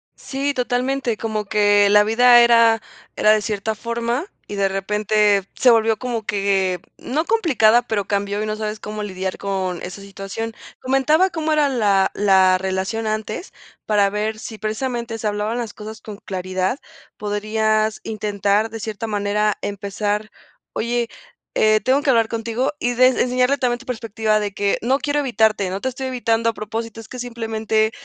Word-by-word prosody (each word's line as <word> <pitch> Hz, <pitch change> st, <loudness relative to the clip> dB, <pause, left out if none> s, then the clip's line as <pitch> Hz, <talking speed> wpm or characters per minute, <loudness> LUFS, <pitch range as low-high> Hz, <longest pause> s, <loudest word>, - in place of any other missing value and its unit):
Sí, 280 Hz, +1 st, -3 dB
totalmente, 250 Hz, -1 st, -1 dB
como 215 Hz, -1 st, -3 dB
que 205 Hz, -1 st, +4 dB
la 210 Hz, 0 st, +6 dB
vida 240 Hz, +3 st, +6 dB
era 230 Hz, -1 st, +5 dB, 0.3 s
era 215 Hz, -, +4 dB
de 215 Hz, 0 st, +3 dB
cierta 210 Hz, 0 st, -2 dB
forma, 235 Hz, -, -2 dB, 0.2 s
y 205 Hz, -, -6 dB
de 200 Hz, -1 st, +2 dB
repente 205 Hz, 0 st, +1 dB
se 250 Hz, -, +5 dB
volvió 225 Hz, -1 st, +3 dB
como 240 Hz, -1 st, -3 dB
que, 195 Hz, -2 st, 0 dB, 0.2 s
no 305 Hz, +6 st, -2 dB
complicada, 255 Hz, -, +4 dB
pero 220 Hz, -4 st, -2 dB
cambió 200 Hz, 0 st, -1 dB
y -, -, -2 dB
no 215 Hz, 0 st, -2 dB
sabes 215 Hz, 0 st, -4 dB
cómo 210 Hz, 0 st, -6 dB
lidiar 190 Hz, -2 st, -4 dB
con 190 Hz, -3 st, -2 dB
esa 190 Hz, +2 st, -7 dB
situación. 200 Hz, +3 st, -6 dB, 0.3 s
Comentaba 300 Hz, +8 st, +3 dB
cómo 315 Hz, -2 st, -2 dB
era 300 Hz, -2 st, +3 dB
la 205 Hz, -7 st, +2 dB
la 190 Hz, -2 st, +4 dB
relación 190 Hz, +4 st, -2 dB
antes, 215 Hz, -, -4 dB, 0.3 s
para 205 Hz, -2 st, +3 dB
ver 215 Hz, +1 st, -2 dB
si 220 Hz, 0 st, -8 dB
precisamente 230 Hz, +1 st, -3 dB
se 220 Hz, -, -7 dB
hablaban 210 Hz, +2 st, -2 dB
las 235 Hz, -3 st, -4 dB
cosas 220 Hz, +1 st, -9 dB
con 210 Hz, -2 st, -9 dB
claridad. 185 Hz, +5 st, -3 dB, 0.4 s
Podrías 215 Hz, +1 st, 0 dB
intentar 210 Hz, 0 st, 0 dB
de 225 Hz, 0 st, -7 dB
cierta 220 Hz, +1 st, -5 dB
manera 210 Hz, 0 st, 0 dB
empezar: 205 Hz, +1 st, -2 dB, 0.4 s
"Oye, 235 Hz, +1 st, -1 dB, 0.5 s
eh, 215 Hz, 0 st, +4 dB
tengo 270 Hz, +4 st, +2 dB
que 275 Hz, -, +3 dB
hablar 230 Hz, -2 st, +3 dB
contigo", 230 Hz, +4 st, -2 dB
y 245 Hz, -, 0 dB
de 255 Hz, +1 st, +6 dB
enseñarle 255 Hz, +1 st, +2 dB
también 245 Hz, -3 st, 0 dB
tu 265 Hz, -, -15 dB
perspectiva 220 Hz, -3 st, 0 dB
de 205 Hz, -1 st, -3 dB
que: 200 Hz, 0 st, 0 dB
"No 265 Hz, +4 st, +2 dB
quiero 295 Hz, 0 st, 0 dB
evitarte, 220 Hz, -6 st, +1 dB
no 195 Hz, +1 st, -4 dB
te 260 Hz, -, -1 dB
estoy 260 Hz, +1 st, -6 dB
evitando 230 Hz, -3 st, +1 dB
a -, -, -2 dB
propósito, 225 Hz, +1 st, -5 dB
es 225 Hz, -, -10 dB
que 255 Hz, -, -8 dB
simplemente 220 Hz, -2 st, -1 dB
220 Hz, 170 wpm, -21 LUFS, 205-240 Hz, 0.5 s, la